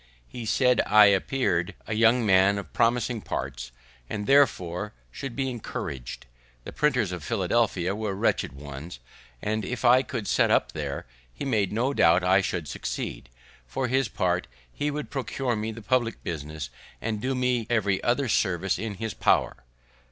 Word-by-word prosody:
He 115 - -7
said 125 +2 +3
I 105 0 +8
appear'd 95 -4 0
a 110 - -3
young 115 +2 +4
man 95 0 +5
of 100 - -7
promising 120 -1 +1
parts, 65 -6 -5 0.4
and 105 -1 -3
therefore 105 -8 +2 0.2
should 135 -4 -6
be 135 -1 -1
encouraged; 70 - -6 0.4
the - - -7
printers 125 -11 +1
at 90 - -5
Philadelphia 95 -1 0
were 105 -2 -3
wretched 95 - 0
ones; 70 +3 -8 0.5
and, 110 0 -1
if 125 +3 -4
I 125 +2 +6
would 115 -6 -3
set - - +3
up - - +2
there, - - -4 0.3
he - - -6
made 110 -8 +1
no 120 +6 0
doubt 90 -6 +4
I 95 +2 +4
should 90 -4 -3
succeed; 75 - -5 0.4
for 125 - -2
his 130 0 +2
part, 90 -4 -1 0.3
he 145 - -1
would 150 0 -5
procure 135 -2 -2
me 110 +1 -3
the 115 0 -9
public 120 -1 0
business, 75 -2 -5 0.3
and 110 -2 -3
do 130 +2 -1
me 125 -3 0
every 100 -5 +1
other 130 +3 +1
service 95 -4 +1
in 110 -2 -4
his 110 +1 -4
power. - - +2
110 Hz, 165 wpm, -26 LUFS, 90-125 Hz, 0.5 s, I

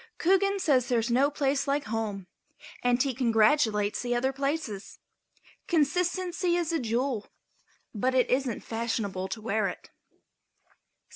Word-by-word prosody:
Coogan 390 +3 +2
says 265 -9 +2
there 245 - +2
is 230 +1 0
no 265 +4 +4
place 280 -1 0
like 285 +1 +1
home 210 -3 -3 0.6
and 245 0 +2
he 275 -2 -1
congratulates 225 -3 +2
the 245 -1 -1
other 260 +3 0
places. 275 -7 -3 0.7
Consistency 350 +3 +1
is 345 -2 0
a 325 - +1
jewel, 240 -1 -1 0.7
but 255 +4 0
it 255 - +4
isn't 255 -3 0
fashionable 225 -5 -3
to 215 +3 -6
wear 215 -2 0
it. 180 - -8
255 Hz, 135 wpm, -28 LUFS, 225-290 Hz, 0.7 s, no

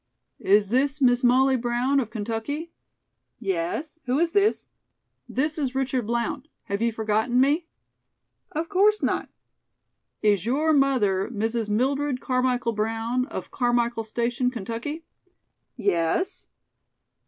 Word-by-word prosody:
"Is 205 0 +3
this 270 +5 +1
Miss 250 -2 +3
Molly 260 +2 +4
Brown 245 +3 +1
of 235 -5 -2
Kentucky?" 230 +9 -4 0.7
"Yes. 195 - -3
Who 250 +2 +1
is 335 +1 +2
this?" 405 +2 +2 0.6
"This 300 +4 -1
is 265 -3 -2
Richard 260 -4 -1
Blount. 235 +5 -2 0.2
Have 200 +1 -3
you 235 0 +2
forgotten 220 +2 +1
me?" 295 +6 +2 0.8
"Of 320 +2 -2
course 410 +3 +3
not." - - 0 0.9
"Is 205 -4 +3
your 295 +8 +2
mother 245 -10 +2
Mrs. 225 0 -2
Mildred 270 +4 0
Carmichael 250 -2 0
Brown, 225 +4 -1
of 330 - -7
Carmichael 240 -2 +1
Station, 235 +3 -1
Kentucky?" 240 +7 -5 0.7
"Yes." 200 - 0
245 Hz, 120 wpm, -25 LUFS, 225-280 Hz, 0.9 s, Molly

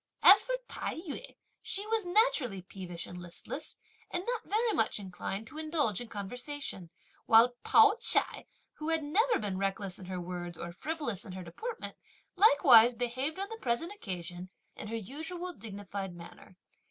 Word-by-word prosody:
As - - +10
for - - -1
Tai - - -4
yü 325 -4 -6 0.3
she 400 +2 -2
was 440 -3 -1
naturally 350 - +2
peevish 180 -2 -7
and 180 0 -9
listless, 175 -1 -7 0.3
and 355 - -3
not 475 -1 -3
very 445 +2 +2
much 225 - +1
inclined 195 +2 -5
to 305 +6 -9
indulge 305 - 0
in 240 - -7
conversation; 225 - -5 0.4
while 230 +2 +7
Pao 435 0 +6
ch'ai, - - +4 0.3
who 305 +1 -4
had 325 -1 +1
never 435 +12 +2
been 195 -3 -3
reckless 195 -1 -2
in 185 - -9
her 185 0 -4
words 175 -1 -6
or 170 - -6
frivolous 260 - -4
in 190 - -9
her 185 0 -7
deportment, 450 - -5 0.4
likewise 255 - +7
behaved 255 +6 -2
on 395 +1 -3
the 450 - -7
present 265 +10 -1
occasion 180 - -6 0.3
in - - -7
her 225 - -4
usual 325 - -5
dignified 200 - -6
manner. 175 +1 -13
235 Hz, 165 wpm, -31 LUFS, -, 0.4 s, As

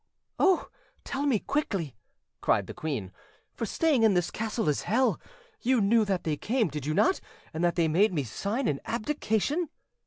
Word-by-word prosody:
"Oh, 380 -2 +3 0.3
tell 280 +2 -2
me 260 -6 +3
quickly!" 195 - -2 0.5
cried - - +2
the - - -8
queen; 130 -12 -4 0.4
"for 230 - -3
staying 300 +1 +2
in 220 -4 +5
this 175 -1 +1
castle 225 -3 -2
is 150 - +1
hell. 255 +4 +1 0.4
You 255 0 +3
knew 220 +2 +4
that 195 -3 -1
they 155 -2 -1
came, 230 - 0
did 150 -1 -5
you 155 - 0
not, 375 - +3 0.3
and 160 +2 -2
that 175 -1 +2
they 170 -2 +3
made 185 +7 +3
me 150 -6 -1
sign 205 - -2
an 140 - 0
abdication?" 280 - -1
210 Hz, 180 wpm, -28 LUFS, 160-260 Hz, 0.5 s, in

